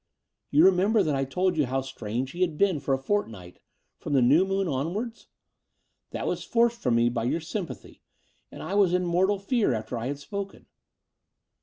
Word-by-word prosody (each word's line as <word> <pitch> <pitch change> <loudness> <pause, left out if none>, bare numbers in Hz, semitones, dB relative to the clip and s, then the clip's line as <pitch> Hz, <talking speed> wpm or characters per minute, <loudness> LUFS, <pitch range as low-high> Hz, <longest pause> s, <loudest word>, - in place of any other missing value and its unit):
You 155 +4 +5
remember 195 +3 +4
that 155 -4 0
I 135 0 0
told 180 +5 0
you 150 -4 +2
how 135 +2 -1
strange 130 -1 -4
he 175 - -7
had 170 -4 +1
been 190 -5 +2
for 135 -1 0
a - - -3
fortnight 115 - -3 0.2
— - - -48
^from - - -4
the 135 - +4
new 155 +10 +4
moon 195 0 0
onwards? 170 - -3 0.8
That - - -5
was - - -2
forced 235 0 +1
from 125 -3 +1
me 115 0 +3
by 115 -1 -1
your 145 +7 0
sympathy: 170 +2 -7 0.5
and - - -9
I - - -5
was 195 -3 +3
in 180 0 0
mortal 185 +4 +2
fear 200 - 0
after 110 +2 -4
I 115 - -3
had 140 +1 -3
spoken. 195 +7 -7
165 Hz, 195 wpm, -26 LUFS, 130-195 Hz, 0.8 s, You